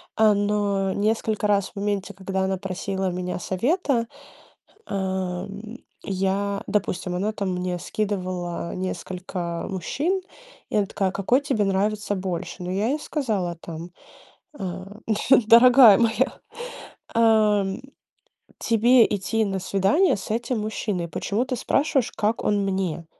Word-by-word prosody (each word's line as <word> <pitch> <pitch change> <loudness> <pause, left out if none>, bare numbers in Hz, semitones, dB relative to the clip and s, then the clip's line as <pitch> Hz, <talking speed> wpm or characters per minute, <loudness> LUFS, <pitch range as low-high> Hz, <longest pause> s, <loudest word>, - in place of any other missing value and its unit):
А, 215 -1 +5
но 205 -1 0
несколько 215 +1 0
раз 200 -2 +1
в - - -37
моменте, 200 -1 -2
когда 190 0 -3
она 190 0 0
просила 190 0 -3
у - - -3
меня 180 0 -3
совета, 240 - 0 0.8
эм, 190 +3 -4 0.3
я 195 +1 -1
Допустим, 190 -3 -1
она 200 +4 -1
там 200 -3 -3
мне 180 0 -2
скидывала 185 -4 -3
несколько 180 -1 -4
мужчин, 290 - -1 0.5
и - - -2
она 210 - +3
такая: 195 0 -1
"Какой 200 +7 +2
тебе 265 -7 0
нравится 205 +2 0
больше?" 185 -1 -4
Ну, 180 - -4
я 200 +4 0
ей 295 +4 -1
сказала 210 - -2
там, 170 +1 -8 0.7
а: 185 -1 -5 0.6
"Дорогая 235 -2 +8
моя, 235 +3 +1 0.7
ам, 215 -4 +3 0.8
тебе 235 +2 +5
идти 215 +2 0
на 195 -2 -2
свидание 200 - +2
с 195 - -8
этим 240 +1 -1
мужчиной, 210 -4 -2
почему 205 +7 -1
ты 260 0 -3
спрашиваешь, 270 0 +1
как 215 +2 -1
он 205 -1 +2
мне?" 190 -4 -2
200 Hz, 130 wpm, -24 LUFS, 185-220 Hz, 0.8 s, Дорогая